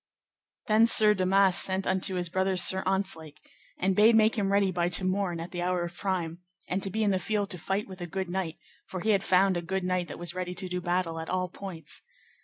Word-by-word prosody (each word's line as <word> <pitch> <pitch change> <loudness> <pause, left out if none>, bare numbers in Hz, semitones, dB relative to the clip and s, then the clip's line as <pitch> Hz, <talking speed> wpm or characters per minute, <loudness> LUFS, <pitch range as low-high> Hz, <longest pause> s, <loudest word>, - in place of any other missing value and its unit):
Then 225 0 +4
Sir 215 -2 +6
Damas 190 -1 +3
sent 190 0 -1
unto 190 0 0
his 175 -1 0
brother 190 +2 0
Sir 190 +1 +5
Ontzlake, 165 -6 -2 0.4
and 190 +1 +1
bade 220 +3 +6
make 220 0 +4
him 200 -3 0
ready 200 -1 +3
by 175 -1 0
to 180 +2 +1
morn 185 -2 -1
at 165 +2 -7
the 175 - -4
hour 180 0 0
of 175 0 -5
prime, 175 -4 -3 0.3
and 190 +2 -1
to 195 - -1
be 220 +3 -1
in 205 - +2
the 190 - +1
field 205 -1 -2
to 180 - -4
fight 195 +5 -2
with 190 -2 -10
a 175 - -4
good 190 +2 -3
knight, 175 -3 -3 0.3
for 185 - -6
he 220 - +2
had 195 -2 +2
found 190 0 +3
a - - -2
good 190 +2 -3
knight 180 -1 -1
that 145 - -8
was 175 0 -4
ready 180 0 -4
to 185 - -2
do 180 0 -3
battle 175 -2 -1
at 160 - -6
all 185 0 -1
points. 175 -5 -8
185 Hz, 240 wpm, -28 LUFS, 175-195 Hz, 0.4 s, Sir